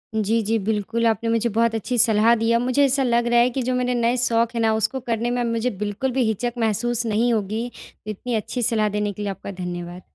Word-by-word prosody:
जी, 220 +1 +1
जी। 225 +2 +1
बिल्कुल, 220 +3 -1
आपने 225 +1 0
मुझे 230 +1 +1
बहुत 230 0 +2
अच्छी 245 +3 -2
सलाह 220 0 +5
दी 225 0 -1
है। 235 - +4
अब 235 - +2
मुझे 255 +3 +2
ऐसा 275 0 +1
लग 240 -1 +1
रहा 240 0 +4
है 240 +1 +4
कि 260 +2 -3
जो 255 +1 -1
मेरे 250 0 0
नए 240 +1 +1
शौक़ 235 -1 +2
है 230 - 0
ना, 220 -1 +3
उसको 220 +5 -1
करने 235 -1 -2
में 245 0 -1
अब 240 - -1
मुझे 230 +2 0
बिल्कुल 210 +6 -2
भी 260 0 +1
हिचक 230 +3 -1
महसूस 235 +1 0
नहीं 230 +2 +1
होगी। 215 +2 -2 0.4
इतनी 220 +3 -4
अच्छी 220 +3 -3
सलाह 220 -2 +2
देने 210 0 -1
के 210 - -8
लिए 205 -1 -2
आपका 195 - -8
धन्यवाद। 175 -1 -6
230 Hz, 250 wpm, -22 LUFS, 215-240 Hz, 0.4 s, सलाह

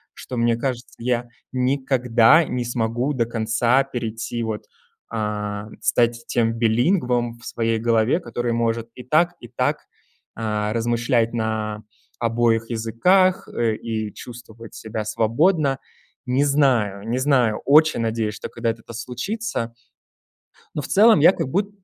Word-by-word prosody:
что, 125 - -7
мне 115 0 +2
кажется, 125 0 -4
я 120 0 -1 0.2
никогда 130 +1 +3
не 125 -3 -3
смогу 120 +3 -1
до 120 -4 0
конца 115 +3 +1
перейти, 120 -2 -4
вот, 110 -2 -4 0.5
а, 105 -1 -3
стать 120 0 +1
тем 115 -1 +1
билингвом 120 - +1
в 120 - -15
своей 115 -1 -1
голове, 115 +5 +2
который 120 -4 -3
может 115 0 -1
и 125 - -9
так, 155 +7 +2
и 120 - -11
так, 120 - -1 0.5
а, 105 -1 -2
размышлять 115 0 +1
на 110 -2 -2 0.4
обоих 115 -1 +1
языках, 180 - +2
э, 115 -2 0
и 110 -2 -4
чувствовать 115 -2 -11
себя 110 -1 -5
свободно. 135 - +1 0.5
Не 130 +2 +1
знаю, 120 -8 +1
не 120 +3 -1
знаю, 130 -6 +2
очень 155 0 +5
надеюсь, 110 -1 -1
что - - -7
когда-то 115 -1 -3
это 115 - -12
случится. 125 - -4 1.0
Но 150 - -2
в - - -6
целом 215 -3 +6
я 165 +5 +7
как 140 - -3
буд 200 +8 0
120 Hz, 135 wpm, -22 LUFS, 115-130 Hz, 1.0 s, я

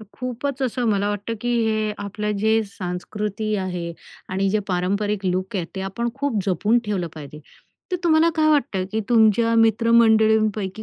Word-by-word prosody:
तर - - -10
खूपच 260 +2 -3
असं 250 -1 -1
मला 200 0 +1
वाटतं, 205 +2 -3
की 245 0 -1
हे 215 -1 0
आपलं 210 +1 -3
जे 220 +2 +2 0.2
संस्कृती 210 +4 -3
आहे 180 -3 -3 0.4
आणि 195 +1 0
जे 215 - +2
पारंपरिक 200 +2 -1
लूक 185 +2 -1
आहेत, 175 - -2
ते 190 - -2
आपण 235 +4 -2
खूप 275 -6 -1
जपून 205 +6 +2
ठेवलं 195 -5 -2
पाहिजे, 150 0 -10 0.5
तर - - +2
तुम्हाला 325 0 +4
काय 310 0 +3
वाटतं 235 -11 +1
की 220 - 0
तुमच्या 230 0 +4
मित्रमंडळींपैकी 220 -2 +3
215 Hz, 160 wpm, -22 LUFS, 195-230 Hz, 0.5 s, तुम्हाला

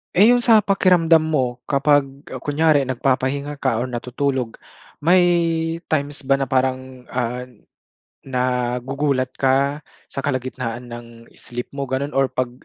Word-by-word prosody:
Eh, 205 +5 +7
yung 245 0 +3
sa 225 -3 +6
pakiramdam 175 -5 +3
mo 130 -6 0
kapag, 145 0 +3 0.2
ah, 130 - -5
kunyari 145 0 +2
nagpapahinga 135 +3 -1
ka 130 -5 0
or 130 - -3
natutulog, 125 0 -2 0.5
may 180 +4 +5 0.7
times 145 -2 -1
ba 135 0 +2
na 135 - -1
parang, 130 -1 -1
ah, 125 0 -3 0.8
nagugulat 130 +1 -1
ka 140 +2 +2 0.3
sa - - -4
kalagitnaan 130 -3 -4
ng 120 0 -8 0.3
sleep 120 0 -7
mo 140 -1 -4
gano'n 135 +3 -2
or 135 0 +2
pag 130 -1 -2
135 Hz, 135 wpm, -21 LUFS, 125-145 Hz, 0.8 s, Eh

